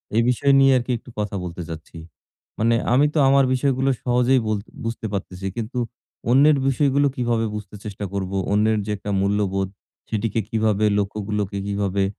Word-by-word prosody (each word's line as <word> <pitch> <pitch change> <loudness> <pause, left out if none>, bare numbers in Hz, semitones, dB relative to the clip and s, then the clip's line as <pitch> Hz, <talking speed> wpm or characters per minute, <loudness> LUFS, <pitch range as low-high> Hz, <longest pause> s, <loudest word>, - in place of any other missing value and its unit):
এই 115 - +5
বিষয় 140 +3 +2
নিয়ে 135 0 +6
আরকি 125 +1 -2
একটু 125 - -15
কথা 105 -1 -2
বলতে 90 0 -6
চাচ্ছি। 80 0 -9 0.6
মানে 115 +1 +3 0.2
আমি 140 +3 +5
তো - - -2
আমার 135 0 +5
বিষয়গুলো 135 0 +1
সহজেই 125 +1 +3
বল 110 -1 +1 0.3
বুঝতে 115 -1 -4
পারতেছি, 95 -1 -5
কিন্তু 115 +3 -4 0.5
অন্যের 145 +3 +6
বিষয়গুলো 140 +1 +2
কিভাবে 120 -2 0
বুঝতে 105 0 -7
চেষ্টা 105 -1 -5
করব? 95 -1 -3 0.2
অন্যের 110 +1 +3
যে 105 - -3
একটা 100 0 -5
মূল্যবোধ, 100 -1 0 0.4
সেটিকে 110 0 -1
কিভাবে, 110 -2 +1
লক্ষ্যগুলোকে 105 0 -2
কিভাবে 100 -1 0
110 Hz, 160 wpm, -22 LUFS, 100-125 Hz, 0.6 s, নিয়ে